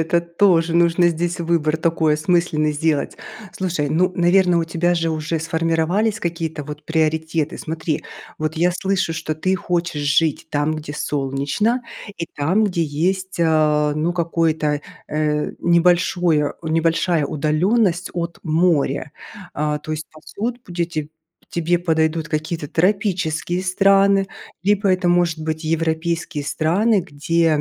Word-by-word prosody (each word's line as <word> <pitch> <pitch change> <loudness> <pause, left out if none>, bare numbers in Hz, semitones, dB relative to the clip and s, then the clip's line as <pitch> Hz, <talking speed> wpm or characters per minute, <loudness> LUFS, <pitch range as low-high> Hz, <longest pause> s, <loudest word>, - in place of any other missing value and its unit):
Это 165 +2 +2
тоже 170 -1 +2
нужно 170 +1 +4
здесь 170 +1 -2
выбор 160 -2 +1
такой 160 -2 +1
осмысленный 155 -1 +1
сделать. 150 -1 0 0.4
Слушай, 175 -6 -2
ну 180 +4 +2
наверно, 175 0 +3
у 165 - +1
тебя 175 +2 0
же 165 -1 0
уже 155 +1 -2
сформировались 165 +6 0
какие-то 165 -3 -3
вот 150 +1 -8
приоритеты. 160 0 0
Смотри, 160 -3 -3 0.3
вот 155 +1 -2
я 175 +2 +3
слышу, 190 -2 -1
что 155 -1 -3
ты 185 +4 0
хочешь 170 -4 -2
жить 145 +2 +1
там, 145 +2 0
где 150 -1 -6
солнечно, 145 - -1 0.3
и 170 - -4
там, 180 +10 +2
где 175 -4 0
есть, 185 +6 -1
э, 155 -2 +3
ну 160 +3 0
какой-то, 160 -3 0 0.3
э, 150 0 -1
небольшое 170 -2 +2
небольшая 165 0 +1
удалённость 175 +6 +1
от 170 -1 -4
моря. 155 -3 +1 0.4
А, 150 0 -1
то 155 - -9
есть 155 0 -4
пасут 230 +10 -6
будете 170 -4 -3 0.4
тебе 170 +1 0
подойдут 160 -1 0
какие-то 155 0 -3
тропические 180 -1 0
страны, 195 +1 +3 0.4
либо 205 0 +2
это 185 0 0
может 175 -2 +2
быть 155 0 -3
европейские 165 0 -1
страны, 190 +9 +2
где, 165 +2 0
165 Hz, 130 wpm, -20 LUFS, 155-175 Hz, 0.4 s, нужно